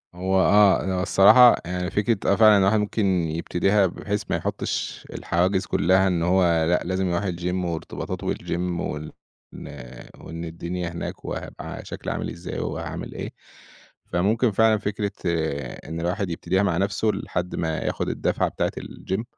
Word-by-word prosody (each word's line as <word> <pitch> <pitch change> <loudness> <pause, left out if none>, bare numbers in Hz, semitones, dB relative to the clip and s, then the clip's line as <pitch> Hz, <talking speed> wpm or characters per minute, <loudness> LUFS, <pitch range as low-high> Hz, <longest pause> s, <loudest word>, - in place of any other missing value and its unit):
هو 95 +1 -1
آه، 100 +1 +5
أنا 95 -1 -1
الصراحة 120 +6 +7
يعني 90 +1 -3
فكرة، 105 -1 +1
آه - - +4
فعلًا 110 -2 +7
الواحد 100 +2 +3
ممكن 105 0 0 0.2
يبتديها 95 +5 +1
بحيث 105 +3 -3
ما - - +1
يحطّش - - -3
الحواجز 95 +3 0
كلّها 95 +2 +3
إن 85 -3 0
هو 90 +1 +3 0.2
لأ 90 - +2
لازم 95 +1 -1
يرُوح 85 +3 0
الgym 90 +1 -2
وارتباطاته 85 -2 -4
بالgym 85 - -4 0.2
وال 75 0 -5 0.4
إن - - -9 0.5
وإن 85 +1 -7
الدنيا 85 +2 -4
هناك 85 +1 -6
وهيبقى - - -6
شكلي - - -5
عامل - - -3
إزاي 85 +1 -6
وهاعمل - - -5
إيه. - - -5 0.8
فممكن 110 +7 +2
فعلًا 110 +2 +4
فكرة 100 0 -2
إن 80 -1 -3
الواحد 90 +2 -1
يبتديها 95 +3 0
مع 90 -4 +1
نفْسه 100 +3 0
لحد 90 0 -3
ما 80 -2 -1
ياخد - - -2
الدُّفعة - - 0
بتاعة - - -1
الgym 95 +5 -4
95 Hz, 150 wpm, -24 LUFS, 85-100 Hz, 0.8 s, الصراحة